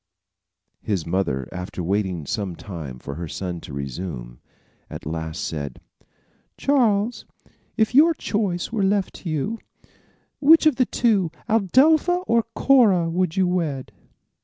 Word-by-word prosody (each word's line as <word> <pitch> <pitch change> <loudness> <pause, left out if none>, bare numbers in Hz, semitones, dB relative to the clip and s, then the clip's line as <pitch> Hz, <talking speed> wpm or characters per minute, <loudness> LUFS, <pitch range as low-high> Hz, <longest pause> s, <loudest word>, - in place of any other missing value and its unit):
His 95 -6 -2
mother 85 -8 -1
after 90 0 -5
waiting 95 -3 -1
some 95 +3 -3
time 80 -10 -8
for 70 +3 -7
her 85 +3 -5
son 90 +1 -5
to - - -10
resume, 70 -3 -6 0.5
at - - -8
last 80 0 -4
said: 70 -5 -5 0.8
"Charles, 235 -5 +1 0.5
if 220 +1 +2
your 320 +5 +6
choice 200 -8 -2
were 225 -3 -1
left 195 -1 0
you, 165 +9 -2 0.8
which 320 +3 +6
of 310 -5 +4
the 255 -3 +2
two, 205 -8 +2 0.2
Adelpha 300 - +3
or 235 -7 +3
Cora, 200 -11 +4
would 180 -1 -1
you 190 - +4
wed?" 155 -10 -2
165 Hz, 130 wpm, -23 LUFS, -, 0.8 s, your